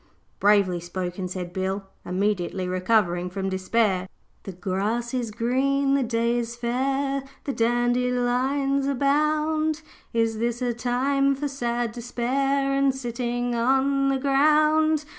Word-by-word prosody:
'Bravely 200 Hz, -4 st, +3 dB
spoken,' 180 Hz, +1 st, -4 dB
said 180 Hz, -1 st, -6 dB
Bill, 190 Hz, +2 st, -2 dB, 0.2 s
immediately 185 Hz, -1 st, -1 dB
recovering 185 Hz, -1 st, +1 dB
from 195 Hz, +1 st, -3 dB
despair. 190 Hz, 0 st, 0 dB, 0.3 s
'The 195 Hz, -, -8 dB
grass 205 Hz, +6 st, -2 dB
is 245 Hz, -3 st, -1 dB
green, 270 Hz, +5 st, +1 dB
the 280 Hz, -, +3 dB
day 235 Hz, 0 st, 0 dB
is 235 Hz, 0 st, -4 dB
fair, 270 Hz, +3 st, -1 dB, 0.2 s
The 280 Hz, -, -3 dB
dandelions 250 Hz, +3 st, +1 dB
abound. 305 Hz, +3 st, +1 dB, 0.3 s
Is 225 Hz, -1 st, 0 dB
this 240 Hz, +1 st, -1 dB
a 245 Hz, -2 st, 0 dB
time 270 Hz, +4 st, +1 dB
for 290 Hz, +2 st, -3 dB
sad 240 Hz, -4 st, -2 dB
despair 270 Hz, +4 st, -1 dB
And 275 Hz, -1 st, +2 dB
sitting 245 Hz, -1 st, -2 dB
on 270 Hz, +3 st, +2 dB
the 270 Hz, -, +1 dB
ground? 305 Hz, +3 st, +3 dB
245 Hz, 120 wpm, -25 LUFS, 210-275 Hz, 0.3 s, Bravely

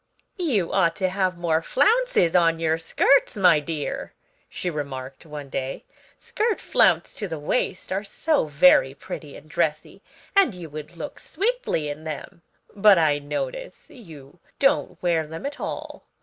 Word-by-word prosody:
"You 230 Hz, -, 0 dB
ought 170 Hz, -4 st, +3 dB
to 185 Hz, -2 st, 0 dB
have 185 Hz, -1 st, -1 dB
more 165 Hz, -2 st, +1 dB
flounces 415 Hz, -, +2 dB
on 165 Hz, -2 st, +4 dB
your 160 Hz, 0 st, +1 dB
skirts, 260 Hz, +11 st, +3 dB
my 180 Hz, -6 st, +5 dB
dear," 150 Hz, 0 st, -4 dB, 0.4 s
she -, -, -5 dB
remarked 140 Hz, -3 st, -5 dB
one 150 Hz, -2 st, -7 dB
day. 135 Hz, 0 st, -4 dB, 0.3 s
"Skirt 440 Hz, 0 st, -1 dB
flounced -, -, +2 dB
to 205 Hz, -, -2 dB
the 165 Hz, -3 st, -5 dB
waist 155 Hz, +6 st, -2 dB
are 190 Hz, +2 st, -1 dB
so 300 Hz, -, 0 dB
very 140 Hz, -2 st, +5 dB
pretty 175 Hz, -5 st, -8 dB
and 150 Hz, -, -15 dB
dressy, 155 Hz, 0 st, -2 dB, 0.3 s
and 380 Hz, -, +4 dB
you 170 Hz, -4 st, -9 dB
would 155 Hz, +3 st, -9 dB
look 165 Hz, -, -7 dB
sweetly 420 Hz, -, -1 dB
in 145 Hz, +2 st, -6 dB
them, 155 Hz, +2 st, -7 dB, 0.3 s
but 205 Hz, -1 st, +6 dB
I 150 Hz, -3 st, +3 dB
notice -, -, -6 dB
you 160 Hz, -, -14 dB, 0.2 s
don't 275 Hz, -, +1 dB
wear 165 Hz, -3 st, +1 dB
them 160 Hz, -, -8 dB
at 285 Hz, -, -5 dB
all. -, -, -6 dB
170 Hz, 155 wpm, -24 LUFS, 150-210 Hz, 0.4 s, but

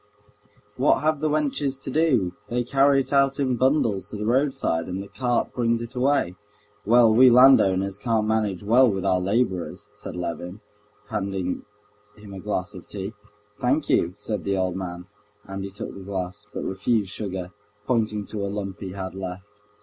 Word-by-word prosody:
"What 135 Hz, +3 st, +3 dB
have 155 Hz, -1 st, +2 dB
the 155 Hz, +1 st, 0 dB
wenches 145 Hz, -2 st, 0 dB
to 135 Hz, -, -4 dB
do? 130 Hz, -, +2 dB, 0.2 s
They 120 Hz, +1 st, 0 dB
carry 135 Hz, +2 st, +4 dB
it 135 Hz, +1 st, -6 dB
out 140 Hz, 0 st, +3 dB
in 130 Hz, -3 st, +1 dB
bundles 125 Hz, -6 st, +1 dB
to 105 Hz, -, -6 dB
the 105 Hz, -, -3 dB
roadside, 130 Hz, -, +1 dB
and 90 Hz, +1 st, -4 dB
the -, -, -11 dB
cart 120 Hz, +2 st, -1 dB
brings 115 Hz, -1 st, +1 dB
it 115 Hz, +1 st, -7 dB
away." 130 Hz, -7 st, +1 dB, 0.5 s
"Well, 115 Hz, -1 st, +6 dB
we 125 Hz, +3 st, +8 dB
landowners 100 Hz, -7 st, +5 dB
can't 115 Hz, -1 st, +1 dB
manage 105 Hz, -4 st, 0 dB
well 120 Hz, +5 st, +5 dB
with 95 Hz, -2 st, -2 dB
our 90 Hz, -1 st, +3 dB
laborers," 95 Hz, -1 st, -1 dB
said -, -, -8 dB
Levin, 90 Hz, +2 st, -5 dB, 0.5 s
handing 95 Hz, -2 st, -3 dB, 0.5 s
him 105 Hz, -1 st, -11 dB
a 95 Hz, -, -7 dB
glass 105 Hz, 0 st, -3 dB
of 90 Hz, -3 st, -11 dB
tea. 100 Hz, +1 st, -6 dB, 0.5 s
"Thank 140 Hz, +5 st, +1 dB
you," 85 Hz, +1 st, +2 dB
said 105 Hz, 0 st, -4 dB
the 100 Hz, 0 st, 0 dB
old 95 Hz, -1 st, 0 dB
man, 90 Hz, -2 st, -5 dB, 0.4 s
and 95 Hz, 0 st, -6 dB
he 100 Hz, -, -5 dB
took 95 Hz, -, -7 dB
the -, -, -9 dB
glass, 95 Hz, +1 st, -5 dB
but -, -, -5 dB
refused 100 Hz, +1 st, 0 dB
sugar, 95 Hz, -4 st, -4 dB, 0.3 s
pointing 110 Hz, -4 st, 0 dB
to 105 Hz, -1 st, -4 dB
a 100 Hz, -, -2 dB
lump 100 Hz, -2 st, -5 dB
he 95 Hz, -2 st, -6 dB
had 95 Hz, -1 st, -5 dB
left. 95 Hz, 0 st, -6 dB
105 Hz, 180 wpm, -24 LUFS, 95-125 Hz, 0.5 s, we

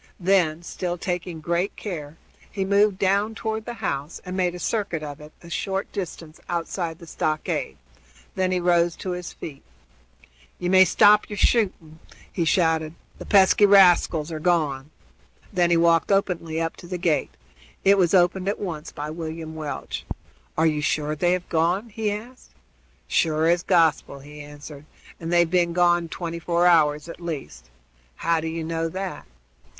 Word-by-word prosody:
Then, 175 Hz, -3 st, +2 dB
still 175 Hz, 0 st, -4 dB
taking 175 Hz, -2 st, -4 dB
great 175 Hz, +4 st, -1 dB
care, 160 Hz, -6 st, -6 dB, 0.3 s
he 195 Hz, -2 st, -3 dB
moved 200 Hz, 0 st, +3 dB
down 200 Hz, +3 st, +1 dB
toward 220 Hz, -1 st, -3 dB
the 240 Hz, -, -6 dB
house 140 Hz, +3 st, -3 dB
and 180 Hz, 0 st, -5 dB
made 180 Hz, -2 st, 0 dB
a -, -, -7 dB
circuit 195 Hz, -7 st, -2 dB
of 145 Hz, 0 st, -7 dB
it 150 Hz, 0 st, -12 dB
a 170 Hz, -, -11 dB
short 195 Hz, +2 st, -2 dB
distance 165 Hz, -4 st, -7 dB
outside 170 Hz, -1 st, -3 dB
the 170 Hz, -, -13 dB
stockade; 155 Hz, -, -2 dB, 0.6 s
then 185 Hz, -1 st, 0 dB
he 185 Hz, -, +1 dB
rose 175 Hz, -1 st, +2 dB
to 185 Hz, -, -5 dB
his 180 Hz, -1 st, -5 dB
feet. 140 Hz, -4 st, -9 dB, 1.0 s
"Yer 180 Hz, 0 st, -2 dB
may 190 Hz, 0 st, +7 dB
stop 205 Hz, +3 st, +5 dB
shooting," 185 Hz, -8 st, 0 dB, 0.3 s
he 170 Hz, -, 0 dB
shouted. 160 Hz, -2 st, +1 dB, 0.2 s
"The -, -, -9 dB
pesky 200 Hz, +1 st, +5 dB
rascals 175 Hz, -5 st, +5 dB
are 155 Hz, -, -4 dB
gone." 150 Hz, -5 st, 0 dB, 0.6 s
Then 175 Hz, -2 st, +2 dB
he 170 Hz, -, +4 dB
walked 165 Hz, +2 st, +3 dB
openly 175 Hz, -5 st, 0 dB
up 165 Hz, 0 st, -2 dB
to 175 Hz, -, -12 dB
the 180 Hz, 0 st, -4 dB
gate; 165 Hz, -4 st, -1 dB, 0.5 s
it 200 Hz, +1 st, +6 dB
was 185 Hz, -1 st, +3 dB
opened 185 Hz, +1 st, +2 dB
at 205 Hz, -, -1 dB
once 165 Hz, -6 st, -5 dB
by 150 Hz, +1 st, -6 dB
William 160 Hz, 0 st, -6 dB
Welch. 155 Hz, -2 st, -5 dB, 0.5 s
"Are 160 Hz, -, +3 dB
you 155 Hz, -2 st, +1 dB
sure 150 Hz, 0 st, -1 dB
they 175 Hz, +3 st, +2 dB
have 180 Hz, -1 st, -3 dB
gone?" 175 Hz, +7 st, 0 dB
he 215 Hz, 0 st, -2 dB
asked. 230 Hz, +5 st, -7 dB, 0.6 s
"Sure 160 Hz, -1 st, +1 dB
as 175 Hz, +1 st, +3 dB
gospel," 165 Hz, -6 st, +2 dB
he 150 Hz, +2 st, -11 dB
answered, 145 Hz, 0 st, -11 dB, 0.3 s
"and 165 Hz, 0 st, -5 dB
they've 175 Hz, -1 st, +4 dB
been 175 Hz, -2 st, +2 dB
gone 175 Hz, -1 st, +2 dB
twenty 170 Hz, 0 st, -5 dB
four 170 Hz, +1 st, +1 dB
hours 150 Hz, -3 st, +4 dB
at 170 Hz, -, -10 dB
least." 140 Hz, -, -7 dB, 0.5 s
"How 165 Hz, 0 st, +1 dB
do 160 Hz, -, -4 dB
you 165 Hz, 0 st, -4 dB
know 165 Hz, 0 st, -2 dB
that?" 190 Hz, -, -6 dB
170 Hz, 165 wpm, -24 LUFS, 160-185 Hz, 1.0 s, may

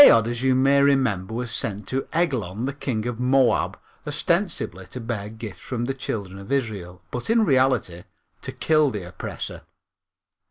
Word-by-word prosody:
Aod, 115 Hz, -, +8 dB
as 120 Hz, 0 st, -2 dB
you 130 Hz, -1 st, +3 dB
may 135 Hz, +2 st, +5 dB
remember, 130 Hz, -9 st, +2 dB
was 120 Hz, 0 st, -3 dB
sent 105 Hz, -2 st, -3 dB
to 135 Hz, +1 st, -1 dB
Eglon, 125 Hz, -, 0 dB
the 140 Hz, +2 st, -1 dB
king 120 Hz, -5 st, -2 dB
of 120 Hz, -1 st, -3 dB
Moab, 130 Hz, 0 st, +3 dB, 0.3 s
ostensibly 150 Hz, -, -1 dB
to 125 Hz, -, -7 dB
bear 115 Hz, -3 st, -4 dB
gifts 110 Hz, -2 st, -8 dB
from 120 Hz, -2 st, -3 dB
the 135 Hz, -, -1 dB
Children 100 Hz, -7 st, -5 dB
of 100 Hz, +4 st, -9 dB
Israel, 100 Hz, -10 st, -2 dB
but, 125 Hz, -, -4 dB
in 225 Hz, -1 st, +4 dB
reality, 130 Hz, -, +2 dB, 0.4 s
to -, -, -5 dB
kill 155 Hz, -2 st, +3 dB
the 105 Hz, -7 st, -4 dB
oppressor. 90 Hz, -, -6 dB
120 Hz, 165 wpm, -24 LUFS, 105-135 Hz, 0.4 s, Aod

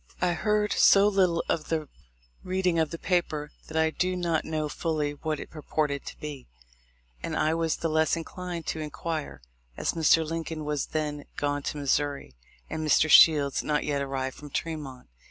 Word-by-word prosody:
I 180 Hz, -1 st, +2 dB
heard 210 Hz, +4 st, +1 dB
so 200 Hz, +1 st, +6 dB
little 185 Hz, -4 st, +2 dB
of 155 Hz, -, -1 dB
the 155 Hz, -2 st, -1 dB, 0.6 s
reading 185 Hz, -2 st, +1 dB
of 160 Hz, -2 st, +1 dB
the 165 Hz, -, -6 dB
paper, 155 Hz, -5 st, -1 dB, 0.2 s
that 160 Hz, -, -4 dB
I 160 Hz, 0 st, +3 dB
do 185 Hz, +3 st, -1 dB
not 170 Hz, -3 st, 0 dB
know 155 Hz, -1 st, -2 dB
fully 150 Hz, 0 st, -1 dB
what 155 Hz, +1 st, -3 dB
it -, -, -8 dB
purported 150 Hz, -2 st, -2 dB
to -, -, -7 dB
be; 150 Hz, -3 st, -7 dB, 0.7 s
and -, -, -3 dB
I 155 Hz, -, +2 dB
was 165 Hz, -1 st, 0 dB
the 165 Hz, -, -2 dB
less 160 Hz, +1 st, +2 dB
inclined 170 Hz, 0 st, -6 dB
to 160 Hz, -, -3 dB
inquire, 155 Hz, -, -5 dB, 0.3 s
as -, -, 0 dB
Mr. 160 Hz, 0 st, +4 dB
Lincoln 160 Hz, -1 st, -4 dB
was 150 Hz, -2 st, -1 dB
then 150 Hz, -2 st, -3 dB
gone 145 Hz, 0 st, -1 dB
to 150 Hz, -, -4 dB
Missouri, 140 Hz, -, -1 dB, 0.3 s
and 155 Hz, -, -4 dB
Mr. 155 Hz, 0 st, +3 dB
Shields 145 Hz, -4 st, +7 dB
not 150 Hz, -1 st, 0 dB
yet 145 Hz, -1 st, -1 dB
arrived 135 Hz, -1 st, -3 dB
from 150 Hz, -, -10 dB
Tremont. 145 Hz, -5 st, -5 dB
155 Hz, 175 wpm, -27 LUFS, 145-165 Hz, 0.7 s, Shields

